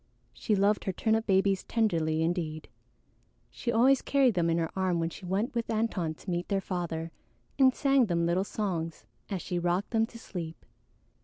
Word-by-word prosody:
She 215 - 0
loved 200 +2 +2
her 190 - 0
turnip 220 +3 0
babies 195 -1 +2
tenderly 165 -8 +1
indeed; 165 -2 -2 0.8
she 235 - -3
always 255 +4 +4
carried 270 -4 +3
them 170 -3 +1
in 165 - +2
her 165 -1 -1
arm 185 -2 +1
when 165 0 -1
she 185 - -10
went 200 +7 -1
with 235 -1 -2
Antone 210 -8 -1
to 185 - -10
meet 175 0 -2
their 200 -1 +1
father 170 -4 -4 0.5
and 260 -1 +6
sang 275 -4 +3
them 170 -2 +1
little 175 +3 +1
songs 175 -6 -3 0.2
as 195 -4 -3
she 180 - -2
rocked 175 +3 0
them 225 -1 +2
to 230 - -12
sleep. 170 -7 -7
190 Hz, 180 wpm, -29 LUFS, 170-225 Hz, 0.8 s, and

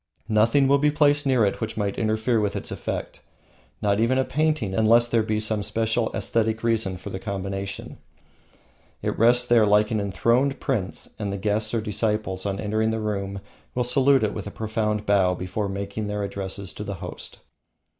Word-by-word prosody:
Nothing 115 +6 +4
else 135 - +3
will 140 - +6
be 150 +1 +3
placed 145 -1 +3
near 125 -5 +4
it 100 - -2
which 110 - -3
might 100 -2 -1
interfere 110 +1 +1
with 105 -1 -1
its - - -5
effect, - - -4 0.6
not 100 0 +2
even 120 +3 +2
a 130 - +2
painting, 155 -9 0
unless 115 +3 +4
there 115 -1 +2
be 110 0 -1
some 110 -1 -1
special 115 +2 0
aesthetic 110 0 0
reason 110 -5 +1
for 90 - -8
the 95 - -4
combination. 100 0 -5 1.0
It - - -1
rests 120 +2 +4
there 120 -2 +5
like 105 +2 +3
an 110 -2 0
enthroned 120 +7 +1
prince, 115 -10 -2
and 100 -2 -2
the 100 - -3
guests 105 +2 0
or 115 - +1
disciples 105 -2 -1
on 100 0 -2
entering 110 +1 0
the 110 0 -1
room 100 -2 -3 0.3
will 125 - +1
salute 135 +1 +3
it 105 - 0
with 105 -1 -6
a - - -3
profound 105 0 -2
bow 95 -3 +3
before 95 +3 -3
making 100 +2 -4
their 105 0 -2
addresses 100 -1 -4
to 105 - -6
the 100 -1 -5
host. - - -7
110 Hz, 190 wpm, -24 LUFS, 100-115 Hz, 1.0 s, will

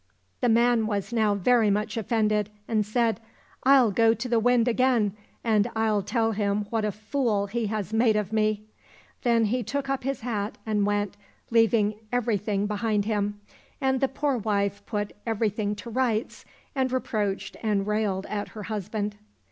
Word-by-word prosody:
The 245 - +2
man 235 -1 +3
was 205 +1 -2
now 215 -3 +2
very 220 +2 +3
much 210 +3 0
offended 215 -2 +1 0.2
and 215 -2 +1
said, 225 +1 0 0.2
" - - -30
I'll 260 -5 +6
go 225 +2 +4
to 235 +3 -4
the 235 -2 +2
Wind 245 +1 +3
again, 240 -4 +2 0.3
and 220 -1 +2
I'll 220 -2 +2
tell 225 +3 0
him 205 -1 0
what 225 -2 0
a 210 - 0
fool 215 0 -1
he 225 +2 -2
has 215 0 -3
made 225 -1 +4
of 210 0 -1
me." 215 -1 +1 0.6
Then 235 -2 +3
he 245 +4 0
took 275 +2 -3
up 275 - -2
his 270 -1 -2
hat 215 -3 -3
and 210 -2 +1
went, 205 -1 -1 0.3
leaving 225 -2 +3
everything 210 -4 0
behind 210 0 0
him. 205 -1 -1 0.4
And 265 -1 +1
the 270 - +4
poor 270 -1 -1
wife 200 -1 -1
put 205 -1 -2
everything 210 -2 0
to 235 +3 -8
rights, 230 -2 -1 0.3
and 260 -2 0
reproached 210 -6 -2
and 205 -3 +1
railed 210 -2 0
at 205 -1 -3
her 210 - -5
husband. 210 0 -3
215 Hz, 170 wpm, -26 LUFS, 205-235 Hz, 0.6 s, I'll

